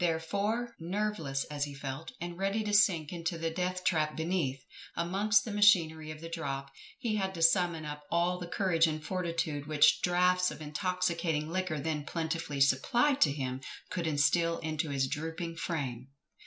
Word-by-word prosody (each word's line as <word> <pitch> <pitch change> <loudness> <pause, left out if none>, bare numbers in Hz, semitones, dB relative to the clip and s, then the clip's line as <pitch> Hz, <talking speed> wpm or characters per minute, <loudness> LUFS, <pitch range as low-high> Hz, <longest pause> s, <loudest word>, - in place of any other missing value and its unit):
Therefore, 200 +8 -1
nerveless 170 -6 -2
as 145 -1 -3
he 145 -1 -8
felt, 140 +3 -6
and 175 0 -5
ready 195 +4 0
to 210 -1 -2
sink 180 -7 +4
into 170 0 -3
the 165 0 -2
death 180 +1 -2
trap 155 -3 +1
beneath, 160 -5 -1 0.4
amongst 195 +5 +2
the 225 - -4
machinery 170 -7 +4
of 155 0 -8
the 165 - -6
drop, 140 -4 -4 0.3
he 230 -5 -1
had 190 -1 -2
to 165 - -1
summon 165 -2 +3
up 150 0 -6
all 175 +1 +1
the 175 - -6
courage 170 -3 +2
and 155 -1 -3
fortitude 165 -5 -2
which 150 -1 +5
draughts 180 +1 +3
of - - -8
intoxicating 165 -1 -1
liquor 185 -4 -1
then 150 0 -2
plentifully 160 -2 -3
supplied 240 - +3
to 145 - +6
him, 130 -2 -3 0.3
could 175 -3 -2
instil 165 +3 +2
into 155 0 -2
his 135 -1 +1
drooping 165 +3 -4
frame. 135 -8 -3
165 Hz, 170 wpm, -31 LUFS, 150-185 Hz, 0.4 s, to